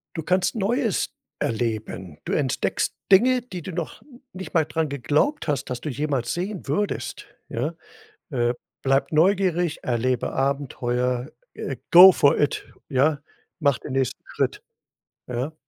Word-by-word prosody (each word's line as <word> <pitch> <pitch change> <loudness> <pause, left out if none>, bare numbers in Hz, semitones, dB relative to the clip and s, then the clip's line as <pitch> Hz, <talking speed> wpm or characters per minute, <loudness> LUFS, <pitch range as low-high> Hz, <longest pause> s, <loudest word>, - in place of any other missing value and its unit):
Du 160 - -3
kannst 185 +5 +1
Neues 225 +2 0 0.3
erleben. 110 -7 -3
Du - - -2
entdeckst - - 0 0.2
Dinge, 250 +6 +6
die 190 -7 -8
du 185 - -6
noch 170 -2 -5 0.3
nicht 190 0 -8
mal 160 -3 +3
dran 155 0 -1
geglaubt 150 - 0
hast, 145 -2 0
dass 125 -1 -4
du 155 - -4
jemals 135 -3 -1
sehen 185 +1 -4
würdest, 200 +9 -2 0.2
ja. - - -2 0.6
Äh, 120 -3 +1 0.3
bleib 135 +2 +1
neugierig, 175 -1 +2
erlebe 125 0 0
Abenteuer, 125 -2 -1 0.2
äh - - -4
go 185 +2 +11
for 140 -4 +4
it 145 - 0 0.2
ja? 145 +2 +2 0.4
Mache 140 -5 +2
den - - -5
nächsten 135 -2 -1
Schritt, - - -2 0.6
ja? 125 +5 -3
145 Hz, 140 wpm, -24 LUFS, 125-180 Hz, 0.6 s, go